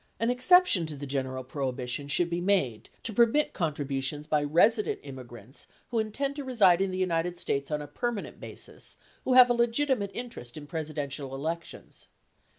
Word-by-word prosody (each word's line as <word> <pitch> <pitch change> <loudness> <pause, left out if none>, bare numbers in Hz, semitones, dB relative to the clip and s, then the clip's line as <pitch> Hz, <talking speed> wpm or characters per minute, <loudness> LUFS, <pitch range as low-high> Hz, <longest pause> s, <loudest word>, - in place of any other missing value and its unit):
An 230 +2 +2
exception 255 - +5
to 155 - -6
the 145 0 -6
general 130 -1 -3
prohibition 130 0 -3
should 170 +4 +1
be 170 +1 -1
made 175 - 0
to 225 - -4
permit 235 +7 +3
contributions 145 -3 -2
by 150 -1 +1
resident 205 +9 +3
immigrants 130 -2 -10 0.2
who 235 - +1
intend 275 +6 -2
to 285 - -3
reside 200 -9 +4
in 195 - +1
the 185 - -4
United 175 -1 0
States 140 -4 -2
on 150 -1 -2
a - - -9
permanent 240 +2 -4
basis - - -6 0.3
who 260 - +2
have 250 -1 +9
a - - +5
legitimate 235 -2 +1
interest 230 - -7
in 150 - -8
Presidential 145 -3 -4
elections. 165 +5 -6
165 Hz, 165 wpm, -28 LUFS, 140-230 Hz, 0.3 s, have